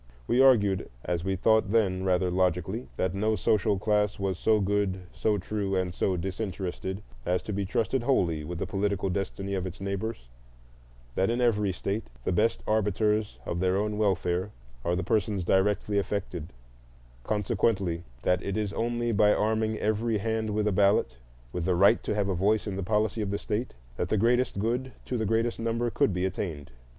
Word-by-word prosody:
We 120 - +3
argued, 105 -8 +4 0.2
as 85 -2 -1
we 95 +1 0
thought 110 +1 +3
then 95 -5 +2
rather 90 -1 +2
logically, 90 +5 0
that 95 -1 0
no 110 +3 +1
social 105 +1 +2
class 105 0 +1
was 95 -2 -2
so 110 -1 +3
good, 100 -1 0
so 105 -1 +1
true, 100 0 -2
and 90 -2 0
so 95 0 0
disinterested 95 +1 -4 0.2
as 90 +4 0
to 105 - -4
be 100 -1 -2
trusted 115 +5 0
wholly 85 - +1
with 85 +3 -5
the - - -2
political 100 -1 -1
destiny 100 +1 -3
of 95 -1 -1
its 90 -1 -8
neighbors; 100 - -4 0.9
that 95 - +1
in 120 +1 0
every 105 -5 +2
state 100 +4 -3 0.2
the - - 0
best 105 +6 +1
arbiters 105 0 +1
of 85 - -2
their 95 +1 +2
own 105 +1 -1
welfare 95 -2 +1 0.3
are 85 - +1
the 95 - -1
persons 100 0 0
directly 100 +3 +2
affected; 90 -5 -4 0.7
consequently 100 -4 0 0.2
that 90 0 +2
it 100 0 -3
is 105 -2 -1
only 120 +1 -1
by 105 -1 +4
arming 110 +1 +1
every 110 +1 0
hand 110 +1 -1
with 105 0 0
a - - +2
ballot,—with 65 - 0
the 90 - +2
right 95 +3 +5
to - - -2
have 100 -2 +1
a 95 - 0
voice 100 +4 +2
in 100 -3 -3
the 100 - -3
policy 105 +3 0
of 105 - -2
the 100 - -1
state,—that - - -4
the 110 - +2
greatest 120 +2 +2
good 120 +5 -1
to 125 - -3
the 110 -3 0
greatest 115 +2 0
number 115 +1 -1
could - - +2
be 90 0 -1
attained. 85 -7 -4
100 Hz, 180 wpm, -28 LUFS, 95-110 Hz, 0.9 s, right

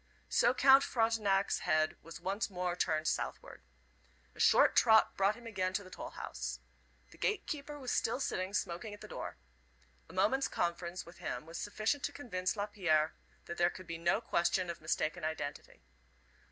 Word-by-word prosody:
So 240 - +4
Count 270 +1 +7
Frontenac's 215 -4 +1
head 155 0 +1
was 165 0 -10
once 195 +5 -2
more 180 -2 -2
turned 155 -3 0
southward. - - -3 0.7
A - - -17
short - - +5
trot 220 -2 +5
brought 195 +2 +2
him 240 +1 -14
again 190 -4 -1
to 200 - -1
the 185 - -13
toll - - -6
house. - - -5 0.5
The - - -17
gatekeeper 295 -8 -2
was 260 -3 -4
still 230 +3 +1
sitting 190 -6 -2
smoking 195 +3 -2
at 205 - -19
the - - -8
door. - - -6 0.7
A - - -12
moment's 215 +9 +2
conference 170 +1 -2
with 170 - -14
him - - -4
was 165 +1 -7
sufficient 215 +6 -1
to - - -2
convince 185 -10 -2
Lapierre 185 -7 +1 0.3
that 170 - -6
there 175 0 +5
could 185 +1 -10
be 165 -1 -6
no 170 +6 +2
question 175 -4 +1
of 170 - -10
mistaken 155 +2 -1
identity. 150 -2 -5
185 Hz, 170 wpm, -34 LUFS, 170-220 Hz, 0.7 s, Count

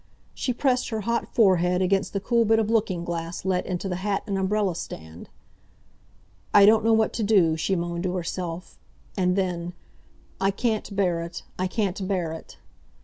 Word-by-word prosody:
She 260 - -2
pressed 250 0 +1
her 220 -2 -2
hot 235 +3 -2
forehead 180 -4 +4
against 190 +1 +1
the 200 - -1
cool 235 +4 +2
bit 225 0 +3
of 220 0 +1
looking 195 -6 0
glass 170 +1 -4
let 185 -1 0
into 185 +1 -3
the 180 -2 -2
hat 200 +1 -1
and 200 - -2
umbrella 195 0 +1
stand. 80 - -8 1.3
"I 200 - +9
don't 220 +1 +5
know 225 - +3
what 220 0 +3
to 225 - -2
do!" 190 -7 +4
she 180 +4 0
moaned 170 0 -3
to 180 0 -1
herself, 175 0 -5 0.4
and 180 -2 +1
then, 175 -2 -2 0.7
"I 195 +1 +2
can't 215 0 -2
bear 180 -4 +1
it! 170 0 -7 0.2
I 185 - +1
can't 190 -1 -2
bear 180 -5 -1
it!" 160 - -10
190 Hz, 180 wpm, -25 LUFS, 175-215 Hz, 1.3 s, I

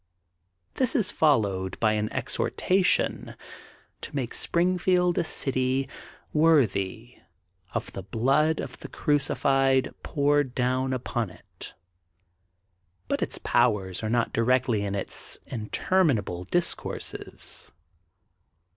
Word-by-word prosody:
This 260 0 +2
is 220 -8 +3
followed 100 - +1
by 110 -1 +3
an 105 0 -1
exhortaition 185 -2 0 0.7
to 145 - -7
make 130 -4 -2
Springfield 180 0 +1
a - - +1
city 130 -3 0 0.5
worthy 120 -8 +1 0.6
of - - -3
the 95 - -5
blood 135 - +1
of - - -6
the - - -8
crucified 135 -3 +1
poured 145 -2 +1
down 130 +1 0
upon 120 -4 -2
it.'* 90 - -13 1.3
But - - -1
its - - -1
powers 95 -6 +1
are 110 - -3
not 120 0 0
directly 120 -2 +2
in 100 0 -2
its 100 - -1
inter 130 - 0
minable 100 - -1
discourses. 175 -1 -1
130 Hz, 105 wpm, -26 LUFS, 110-150 Hz, 1.3 s, is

